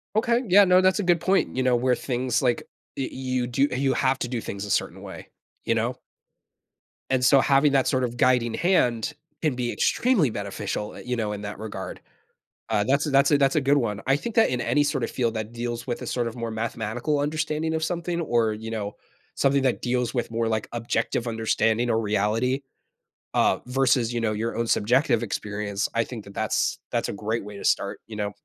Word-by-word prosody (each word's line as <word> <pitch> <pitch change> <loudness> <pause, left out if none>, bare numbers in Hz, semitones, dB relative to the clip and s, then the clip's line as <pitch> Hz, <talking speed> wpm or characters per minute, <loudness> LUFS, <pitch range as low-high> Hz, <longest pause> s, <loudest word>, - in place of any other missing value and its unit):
Okay, 235 +2 +2
yeah, 200 +2 +7
no, 185 0 +5
that's 185 +2 +3
a - - 0
good 175 -2 +2
point, 190 +2 +1
you 130 - +1
know, 125 -1 +3
where 125 +1 +2
things, 125 -1 -1
like 125 -3 +1 0.3
y 135 - -1
you 130 -1 -2
do 135 +4 +2
you 135 +1 +1
have 130 0 +1
to - - -2
do 120 -2 -3
things 100 0 -5
a - - -8
certain - - -1
way, - - -10 0.3
you - - +1
know? - - 0 1.1
And 130 -1 +1
so, 135 +1 +6
having 140 +1 +4
that 135 -1 +3
sort 130 -1 +1
of 120 -1 -3
guiding 120 -3 +3
hand 145 - +1 0.3
can 150 -5 +1
be 120 -1 -2
extremely 225 - +2
beneficial, 105 0 -4
eh, - - -9
you 125 0 -1
know, 110 -3 -2
in 105 - -5
that 105 -1 -6
regard. 105 -3 -6 0.7
Uh, 105 -2 +2
that's 140 +3 +2
a - - 0
that's 140 +2 +4
a 145 - +6
that's 135 -1 +2
a 155 - +3
good 140 +2 +3
one, 110 -5 -1
I 135 - +4
think 230 +7 -6
that 225 - +5
in 125 - -1
any 145 +4 +2
sort 145 -3 -1
of - - -2
field 115 -3 0
that 110 +1 -4
deals 120 0 -4
with 120 - -3
a - - -6
sort 120 -2 -1
of 115 - -6
more 115 -1 -4
mathematical 115 +5 -2
understanding 155 +2 -1
of 160 - -1
something, 170 +1 -2
or, 115 -7 +1
you 110 +1 -7
know, 105 -2 -4 0.4
something 140 0 +2
that 130 - +1
deals 125 -1 -1
with 120 -2 -2
more, 115 0 0
like, 110 -1 -1
objective 120 +1 -1
understanding 115 +1 +1
or 115 -1 +2
reality, 110 +6 0 0.7
uh, - - +3
versus, 125 -2 +2
you 120 - -1
know, 110 - +1
your 110 +2 -2
own 115 - 0
subjective 120 +2 +2
experience, 105 -1 -3
I 115 - +2
think 115 -5 -8
that 100 - -12
that's - - 0
that's - - -1
a - - -3
great 110 +2 -2
way 105 -1 -9
to - - -7
start, 100 - +1
you 110 - -8
know? 105 -1 -2
120 Hz, 220 wpm, -25 LUFS, 110-140 Hz, 1.1 s, yeah